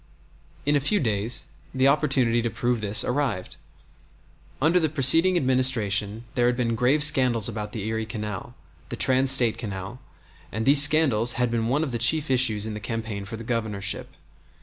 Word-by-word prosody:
In 145 +1 +2
a - - +3
few 200 +9 0
days 115 - -2 0.3
the 130 +1 +2
opportunity 135 -5 +1
to 120 - -2
prove 120 0 -2
this 105 0 +1
arrived. 125 -8 -3 1.0
Under 165 +6 +2
the 160 -2 0
preceding 160 +6 +4
Administration 115 - +1
there 120 -1 +1
had 125 0 0
been 120 -2 -1
grave 125 +6 +2
scandals 130 -7 +2
about 105 -2 -6
the 105 -3 -6
Erie 110 0 -3
Canal, 105 -4 -7 0.3
the - - -5
trans 130 +1 +2
State 125 -4 +3
Canal, 100 +2 -7 0.5
and 110 +2 -4
these 140 +1 +6
scandals 140 -6 +3
had 125 -1 -1
been 115 -1 -1
one 140 +6 0
of 145 - -4
the 120 - -4
chief 145 +5 +2
issues 115 -5 +2
in 110 - -5
the 105 - -6
campaign 110 -3 -5
for 110 +3 -8
the 115 - -9
Governorship. 110 -4 -4
120 Hz, 175 wpm, -24 LUFS, 110-135 Hz, 1.0 s, these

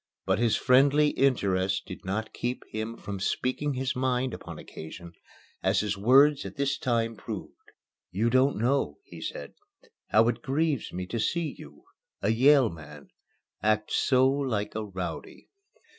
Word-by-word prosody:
But 95 +2 +1
his 115 -2 +3
friendly 140 +3 +4
interest 95 -9 +1
did 90 - -9
not 110 +3 -3
keep 120 +1 -3
him 110 +2 -4
from 100 -1 -6
speaking 130 +8 -1
his 130 0 -2
mind 130 0 0
upon - - -8
occasion, 85 +2 -10 0.5
as 95 +1 +2
his 105 -1 -1
words 135 +8 +5
at - - -8
this 140 -1 -1
time 115 -2 0
proved. - - -7 0.6
"You 110 +5 0
don't 130 +3 +3
know," 130 +6 0
he - - -12
said, - - -6 0.5
"how 110 +1 +4
it 120 -1 -3
grieves 145 0 -1
me 90 +1 -4
to 115 +5 -4
see 160 +7 -1
you - - -14 0.4
a 100 - 0
Yale 130 +1 +5
man 75 -3 -12 0.5
act 110 0 +1
so 130 -1 +3
like 130 -7 -1
a 110 - -3
rowdy." 90 -5 -7
115 Hz, 155 wpm, -28 LUFS, 100-135 Hz, 0.6 s, words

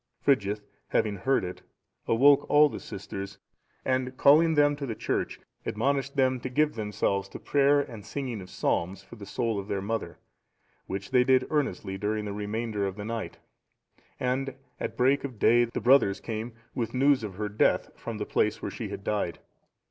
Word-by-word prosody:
Frigyth 105 -6 +1 0.2
having 105 -2 +1
heard 130 +6 +1
it, 90 0 -6 0.5
awoke 140 +5 +5
all 150 0 +6
the - - -6
sisters, 100 0 -7 0.5
and 130 0 0
calling 160 +3 +6
them 145 0 +4
to 140 -2 -4
the 115 - -3
church, - - -2 0.2
admonished 140 +4 -1
them 130 -2 +2
to 130 - -5
give 150 +4 +2
themselves 105 -2 -1
to - - -8
prayer 145 0 +3
and 115 -7 -8
singing 125 -1 -4
of 90 - -11
psalms, 95 +3 -1
for 120 - -13
the 100 -3 -10
soul 115 +1 -1
of 100 - -7
their 100 - -1
mother; 110 +4 -3 0.7
which 100 0 -5
they 125 -1 +5
did 130 0 +4
earnestly 120 -10 -1
during 105 +1 -1
the 100 - -4
remainder 105 0 -2
of 95 - -5
the 105 0 -6
night; 115 0 -4 0.8
and 130 +1 -1 0.2
at 115 - -4
break 135 +3 +3
of 130 -5 -6
day, 120 +3 +5
the 115 - -4
brothers 120 -6 +4
came 115 +1 -5 0.2
with 120 0 -3
news 135 -1 +4
of 100 -4 -5
her 105 +2 -2
death, 105 +1 +1
from - - -6
the - - -3
place - - +1
where - - -4
she - - -5
had - - -7
died. 100 -5 -1
115 Hz, 185 wpm, -28 LUFS, 105-135 Hz, 0.8 s, all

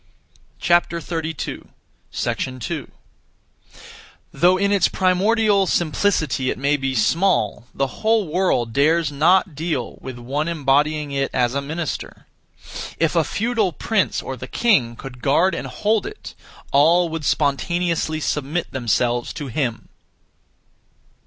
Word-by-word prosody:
2. 170 -3 -1 2.6
Though 175 +6 +3
in 200 +1 +1
its 200 -4 +4
primordial 200 +2 +2
simplicity 155 -6 +1
it - - -2
may 140 +3 +1
be 135 -2 -2
small, 165 - +1
the 135 - 0 0.2
whole 220 -3 +2
world 155 -9 0
dares 155 +3 +2
not 170 +5 +3
deal 155 -5 -3
with 130 -2 -7
(one 140 +6 -2
embodying) 150 -1 +1
it 135 0 -1
as 125 -1 +2
a 140 - -1
minister. 155 +2 -5 0.7
If 165 +1 +1
a 165 - +4
feudal 220 -1 0
prince 210 +5 0
or 130 - -5
the 130 +1 -8
king 130 - +2
could 125 0 -10
guard 170 +9 +3
and - - -4
hold 215 0 0
it, 425 - -9 0.4
all 165 +5 +4
would 160 -1 -4
spontaneously 160 +3 0
submit 150 +3 -2
themselves 120 0 0
to 145 -4 -6
him. 120 -3 -2
155 Hz, 120 wpm, -21 LUFS, 135-180 Hz, 2.6 s, its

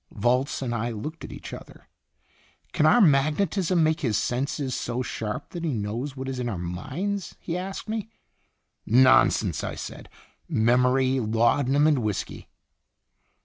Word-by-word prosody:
Volz 125 +6 0
and 120 -2 -2
I 115 +1 -1
looked 145 +9 -6
at - - -7
each - - -9
other. - - -11 0.9
"Can - - +3
our 245 - +6
magnetism 165 +3 +3
make 155 +1 +2
his 115 -8 +1
senses 130 +2 -2
so 120 +1 -2
sharp 105 -3 -5
that 170 -1 -6
he 155 -6 -1
knows 115 +7 -4
what 130 0 -5
is 130 -1 -4
in 120 -1 -2
our 100 - -3
minds?" 145 - -4
he 170 - -4
asked 190 +3 -5
me. 220 0 -3 0.7
"Nonsense!" 125 - +4
I - - -4
said. - - -8 0.4
"Memory, 125 +3 +3
laudanum, 125 +5 +2
and 150 -3 +4
whisky." 105 -4 -4
130 Hz, 145 wpm, -25 LUFS, 115-155 Hz, 0.9 s, our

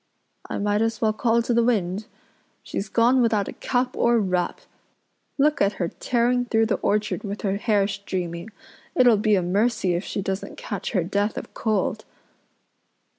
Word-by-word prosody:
I - - -3
might 205 +1 +1
as 225 -1 0
well 215 -1 +2
call 230 +1 +2
to 240 - 0
the 235 - +4
wind. 210 -3 0 0.6
She's 205 - -4
gone 245 +3 +4
without 215 -4 +2
a - - -5
cap 250 0 -1
or 235 0 +3
wrap. 185 -4 -1 0.8
Look 295 +1 +2
at 200 +1 +3
her 175 -3 -2
tearing 245 +3 0
through 225 -1 +2
the 220 - 0
orchard 210 +1 0
with 205 0 -5
her 195 -1 0
hair 205 -2 +2
streaming. 185 -2 -4 0.5
It'll 245 -3 +6
be 210 0 +2
a 185 - +1
mercy 200 +1 +1
if 175 +2 -1
she 200 - -4
doesn't 190 +1 -4
catch - - -5
her 185 -5 +2
death 200 +4 -1
of - - -7
cold." 215 0 -1
215 Hz, 175 wpm, -24 LUFS, 195-235 Hz, 0.8 s, It'll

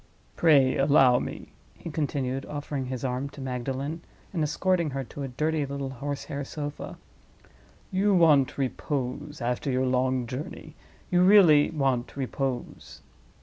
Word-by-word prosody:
Pray 140 -6 +4
allow 135 -3 +5
me," - - -7 0.2
he 165 - -7
continued, 135 -3 -2
offering 145 -2 -4
his 130 -1 -5
arm 130 +2 -2
to 140 - -13
Magdalen, 135 +4 -4 0.3
and 170 - -1
escorting 170 +2 +1
her 135 -1 -3
to 140 - -9
a 135 - -3
dirty 155 +4 -1
little 140 -1 -4
horse 140 +2 -4
hair 140 0 -5
sofa. 145 +1 -6 0.9
"You 195 +1 +2
want 150 -6 +4
repose—after 135 -1 -3
your 130 0 +1
long 130 0 +1
journey, 150 +5 -7 0.4
you 180 0 +4
really 180 -6 +7
want 135 -5 -1
repose." 135 -1 -4
140 Hz, 135 wpm, -27 LUFS, 130-150 Hz, 0.9 s, really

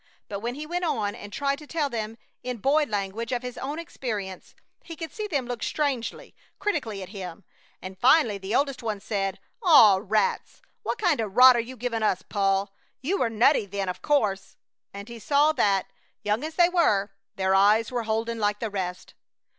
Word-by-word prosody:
But 200 - -5
when 240 +4 -4
he 300 +2 -6
went 350 +3 -3
on 210 -11 0
and 205 - -10
tried 280 +4 -1
to 300 - -12
tell 310 -2 0
them 225 -3 -4 0.2
in 250 -1 -4
boy 290 +7 +2
language 210 +2 -3
of 245 0 -1
his 250 0 -6
own 285 +3 -4
experience 215 - -6 0.3
he 335 - -8
could 320 -2 -7
see 430 -1 -4
them 285 -9 -1
look 245 -1 -5
strangely, 280 -6 -2 0.2
critically 245 - -2
at 185 - -10
him, 190 -2 -8 0.4
and 185 0 -8
finally 250 -6 +4
the 195 +4 -3
oldest 275 -2 0
one 215 -3 -3
said: 195 -2 -2 0.2
"Aw 255 - +7
rats! 215 - -1 0.2
What - - -3
kinda 305 - +1
rot 250 +5 +7
are - - +2
you 250 +3 -5
giving 235 -1 -2
us, 190 -4 +1
Paul? 195 -1 0 0.3
You 375 +9 0
were 235 - +1
nutty 225 0 +3
then, 195 -1 -3
o' - - -1
course!" 210 -7 -1 0.3
and 200 +1 -9
he 235 -1 -9
saw 290 +7 +3
that, 200 -10 +2 0.4
young 210 +5 0
as 315 +1 -5
they 345 0 +6
were, 210 - +2 0.2
their 190 0 +1
eyes 210 +4 +4
were 245 -1 -1
holden 225 +1 -1
like 205 -1 0
the 225 -2 -3
rest. 185 -2 -4
230 Hz, 195 wpm, -26 LUFS, 200-280 Hz, 0.4 s, Aw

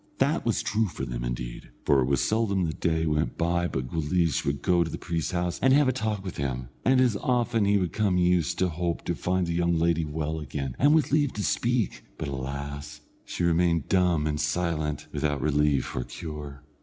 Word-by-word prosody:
That - - +1
was - - +1
true 110 +1 +1
for 85 - -5
them, - - -4
indeed, - - -5 0.2
for 70 - +4
it 65 - +2
was 70 -2 +2
seldom 105 -4 +1
the 80 - -2
day 80 0 0
went 75 0 0
by 85 +1 +1
but 65 -6 -3
Guleesh 80 +1 0
would 70 0 -2
go 90 -2 +3
to 80 - -5
the - - -5
priest's 85 -2 -2
house, 90 -1 -2
and 130 +1 +5
have 145 0 +5
a - - +4
talk 110 -5 -2
with 95 - -6
him, 65 -3 -3
and 130 +1 +4
as 125 -4 +3
often 120 -3 +1
as - - +3
he 100 - +4
would 90 -4 -1
come 100 -4 +1
he 90 - +3
used 90 -3 +1
to 95 - +2
hope 85 0 -3
to - - 0
find 90 0 0
the 85 - -2
young 85 0 +1
lady 85 0 +2
well 80 +1 -3
again, 70 -3 -4
and 145 +3 +5
with 150 -3 +2
leave 145 -2 +2
to 105 - -3
speak; 120 -1 0
but, 80 - -4
alas! 70 +2 -5 0.2
she - - -4
remained 85 -2 +2
dumb 90 -5 +3
and 75 0 -1
silent, 75 -1 -1
without 75 -2 -1
relief 75 -1 +1
or 60 - -1
cure. 75 -1 -8
85 Hz, 220 wpm, -27 LUFS, 75-95 Hz, 0.2 s, and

